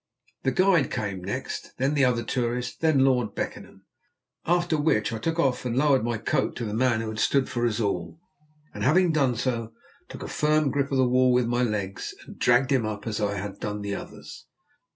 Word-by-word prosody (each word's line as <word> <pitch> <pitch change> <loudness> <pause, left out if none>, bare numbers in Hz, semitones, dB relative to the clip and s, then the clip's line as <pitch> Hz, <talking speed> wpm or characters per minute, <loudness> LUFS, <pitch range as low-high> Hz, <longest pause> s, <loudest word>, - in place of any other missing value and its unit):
The 135 - +1
guide 185 -3 +3
came 100 -4 -4
next, 130 +8 -5
then 135 +3 +1
the 140 -3 +3
other 120 -2 +1
tourist, 125 0 -2
then 155 -5 +4
Lord 125 -5 +1
Beckenham. - - -6 0.6
After 175 -1 +2
which 145 -8 +1
I 115 - -3
took 165 +7 -2
off 135 -6 +1
and 125 -1 -2
lowered 135 -3 +3
my 120 -1 -1
coat 135 +5 -1
to 120 - -4
the 105 - -4
man 120 0 +2
who 110 - -4
had 110 0 -5
stood 135 +2 +2
for 120 0 0
us 110 -1 -2
all, 85 -6 -2 0.5
and - - -5
having 180 +2 +4
done 135 -6 +2
so, 115 -2 -2 0.4
took - - -8
a - - -5
firm 150 -2 +1
grip 140 0 -1
of 135 - +1
the 130 -1 +4
wall 125 +1 +4
with 125 -1 +3
my 120 +1 0
legs, 105 -5 -3
and - - -13
dragged 125 +2 +3
him 130 -4 +3
up 105 -1 -4
as 110 -3 -3
I 100 0 0
had 100 +1 -6
done 105 0 -4
the 100 0 -3
others. - - -9
125 Hz, 215 wpm, -26 LUFS, 110-140 Hz, 0.6 s, then